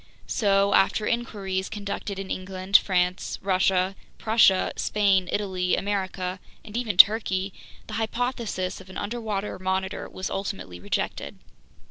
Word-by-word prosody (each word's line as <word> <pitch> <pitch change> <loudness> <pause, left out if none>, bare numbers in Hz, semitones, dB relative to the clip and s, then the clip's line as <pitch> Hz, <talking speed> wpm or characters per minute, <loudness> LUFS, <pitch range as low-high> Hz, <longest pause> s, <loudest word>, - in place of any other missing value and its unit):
So, 200 -2 +2
after 210 +2 +3
inquiries 200 -5 -2
conducted 200 -1 -5
in 195 -1 -5
England, 185 +1 -4
France, 180 -2 +3
Russia, 190 0 +2 0.2
Prussia, 215 -4 +4
Spain, 195 -3 +2
Italy, 185 -3 0
America, 190 -2 -2 0.3
and 215 -1 -10
even 230 -6 -2
Turkey, 195 -2 +5 0.3
the - - -9
hypothesis 225 -5 -2
of 190 - -15
an 185 - -8
underwater 210 -3 -3
Monitor 190 +1 -2
was 185 0 -5
ultimately 195 - -4
rejected. 90 -6 -3
195 Hz, 120 wpm, -25 LUFS, 185-210 Hz, 0.3 s, Turkey